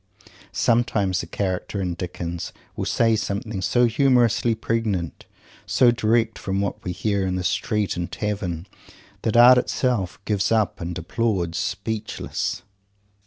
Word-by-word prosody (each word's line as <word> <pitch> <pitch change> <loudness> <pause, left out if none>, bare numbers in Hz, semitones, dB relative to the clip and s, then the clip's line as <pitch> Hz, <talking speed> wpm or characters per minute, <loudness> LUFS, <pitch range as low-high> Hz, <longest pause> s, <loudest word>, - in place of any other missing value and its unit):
Sometimes 105 -6 +1
a 85 - -8
character 95 +2 -2
in 90 -2 -1
Dickens 85 -1 -5 0.2
will - - -3
say 115 -1 +3
something 100 -1 -3
so 120 +7 +3
humorously 120 -2 +3
pregnant, 110 -7 -2 0.4
so 125 -2 +5
directly 115 0 +1
from 95 0 -1
what 100 0 -3
we 90 - -3
hear 100 +2 -1
in 90 -1 -1
street 105 0 0
and 85 0 -4
tavern, 90 -2 -3 0.6
that 110 +1 +1
art 125 +1 +9
itself 120 -9 -1
"gives 100 -1 0
up," 110 -5 +1
and 85 +1 -4
applauds, 90 -2 -1
speechless. 105 +3 -3
100 Hz, 130 wpm, -23 LUFS, 90-115 Hz, 0.6 s, art